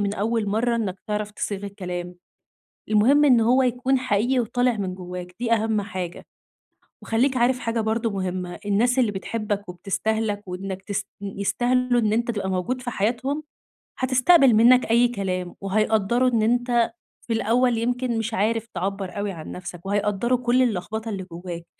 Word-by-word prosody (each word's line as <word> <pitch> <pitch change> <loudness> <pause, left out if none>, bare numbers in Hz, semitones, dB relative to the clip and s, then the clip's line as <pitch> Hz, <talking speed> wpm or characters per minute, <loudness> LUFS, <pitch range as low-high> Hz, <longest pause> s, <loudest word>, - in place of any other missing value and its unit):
من 200 0 0
أول 220 +1 0
مرّة 235 +3 +1
إنّك 195 -5 -2
تعرف 210 0 -2
تصيغ 205 -1 -4
الكلام. 180 -3 -5 0.8
المهم 250 +8 +5
إن 250 -5 +5
هو 250 +4 +4
يكون 255 +1 +1
حقيقي 250 +2 +1
وطالع 245 0 +1
من 185 -2 -3
جوّاك 180 0 -8
دي 240 -1 -1
أهم 220 -1 +1
حاجة. 185 -3 -6 0.8
وخلّيك 255 +4 +1
عارف 250 +1 +2
حاجة 230 0 -2
برضه 225 +1 0
مهمّة، 185 -2 -4
الناس 240 +6 +2
اللي 230 -5 +3
بتحبك 205 0 -3
وبتستاهلك 205 +3 -2
وإنّك 190 +1 -5
تس 200 +1 -2 0.2
ن 195 0 -6
يستهلوا 245 +4 +1
إن 215 -1 +1
أنت 235 +1 +1
تبقى 200 -4 -3
موجود 190 +8 -2
في 245 - -4
حياتهم، 250 +8 -1 0.6
هتستقبل 260 +2 +5
منّك 235 +2 +5
أي 240 +1 +5
كلام 185 -6 -3
وهيقدّروا 215 +4 +2
إن 230 -3 +1
أنت 240 +1 +2 0.4
في 230 - 0
الأول 235 +2 +2
يمكن 245 +1 -1
مش 225 0 -2
عارف 225 +2 0
تعبّر 195 +1 -3
أوي 205 0 -2
عن 160 -4 -8
نفسك 175 0 -8
وهيقدروا 205 +4 +1
كل 250 +1 +2
اللخبطة 220 0 -2
اللي 195 -3 -4
جوّاك. 170 0 -7
220 Hz, 160 wpm, -24 LUFS, 195-245 Hz, 0.8 s, المهم